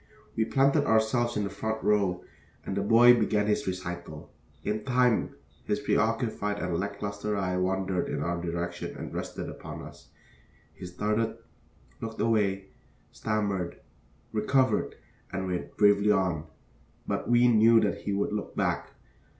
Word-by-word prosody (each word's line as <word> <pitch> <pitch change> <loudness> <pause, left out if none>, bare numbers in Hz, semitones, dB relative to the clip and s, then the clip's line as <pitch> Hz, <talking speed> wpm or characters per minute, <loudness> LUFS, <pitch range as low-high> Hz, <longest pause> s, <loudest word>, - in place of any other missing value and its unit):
We 110 - +1
planted 140 +4 +3
ourselves 115 +2 +2
in 105 - 0
the 100 - -3
front 110 +2 -3
row, 100 -4 +2 0.4
and 95 - -3
the 100 - 0
boy 115 +4 +7
began 105 -3 +1
his 105 -2 0
recital. 90 -4 -6 0.3
In 105 0 -2
time 125 -3 +2 0.3
his - - 0
preoccupied 105 0 0
and 90 -4 -2
lack 100 +1 -4
lustre 100 +1 -2
eye 95 -2 -1
wandered 95 0 0
in - - -2
our 85 0 -2
direction 85 +1 -4
and - - -7
rested - - -5
upon - - -8
us. - - -13 0.7
He 90 - -9
started, 105 +5 -1 0.6
looked 110 0 -6
away, 100 -4 +1 0.4
stammered, 100 -5 -2 0.5
recovered, 115 +2 +1 0.4
and 95 -1 -3
went 90 -1 -4
bravely 105 0 +5
on. 90 -6 +1 0.6
But - - -2
we 120 0 +5
knew 115 0 +6
that 105 - 0
he - - -4
would 100 +1 -1
look 105 -1 -4
back. - - -1
105 Hz, 145 wpm, -28 LUFS, 95-110 Hz, 0.7 s, boy